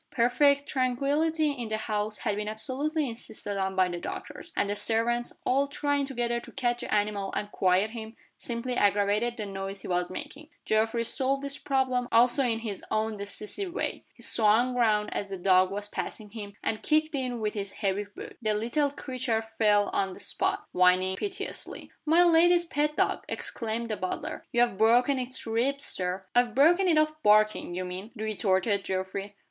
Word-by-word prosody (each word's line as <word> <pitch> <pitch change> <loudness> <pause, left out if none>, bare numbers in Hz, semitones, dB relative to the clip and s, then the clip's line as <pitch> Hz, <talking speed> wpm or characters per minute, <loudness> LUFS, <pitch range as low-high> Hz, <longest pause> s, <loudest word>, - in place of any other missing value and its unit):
Perfect 280 +4 +3
tranquillity 290 +5 +1
in 245 -5 -5
the 220 - -1
house 215 -1 -2
had 205 - -1
been 210 0 -3
absolutely 280 +8 -2
insisted 220 -3 -6
on 190 0 -1
by 185 -1 +4
the 175 -1 -4
doctors; - - -7
and - - +1
the 205 - -1
servants, 235 +3 0
all 275 +2 +2
trying 285 0 0
together 240 -3 -1
to - - -12
catch 240 -2 0
the - - -6
animal 205 -2 0
and 205 0 -3
quiet 190 +3 +2
him, 225 -1 -7 0.2
simply 240 +1 -4
aggravated 205 +3 +2
the 215 - -4
noise 195 0 -5
he - - -8
was 180 -1 0
making. 285 +10 -8 0.2
Geoffrey 225 +2 +1
solved 275 +3 0
this 280 0 -4
problem 260 -2 0
also 245 +4 +5
in 235 -3 +1
his 210 -4 -5
own 220 0 0
decisive 210 - -4
way. - - -2
He - - -7
swung 225 +3 +3
round 215 -4 +2
as 200 - -3
the 195 - -4
dog 185 0 +4
was 205 +1 -5
passing 210 0 -5
him, 205 -2 -8
and 215 - -1
kicked 310 +1 +2
it 255 -3 -2
with 215 -2 -2
his 200 -2 -5
heavy 200 0 -1
boot. 205 - -11
The 215 -2 +1
little 240 +7 +1
creature 255 -5 -2 0.2
fell 205 -2 +4
on 195 -1 0
the - - -12
spot, 390 +1 0
whining 185 +1 +3
piteously. 390 - -5 0.2
"My 335 +3 +6
lady's 345 +1 +5
pet 300 -2 0
dog!" - - +1
exclaimed 230 0 -3
the 215 - -1
butler. 185 - -4
"You've 240 -4 +2
broken 245 +5 +4
its 255 +1 -2
ribs, 250 +5 0
Sir." 185 +1 -2
"I've 240 -2 +2
broken 345 +8 +5
it 330 -3 +4
of 310 0 +1
barking, 215 -5 +3
you 185 0 -3
mean," 185 +4 -6
retorted 205 -2 +1
Geoffrey. 190 +2 -4
225 Hz, 180 wpm, -28 LUFS, 205-270 Hz, 0.2 s, My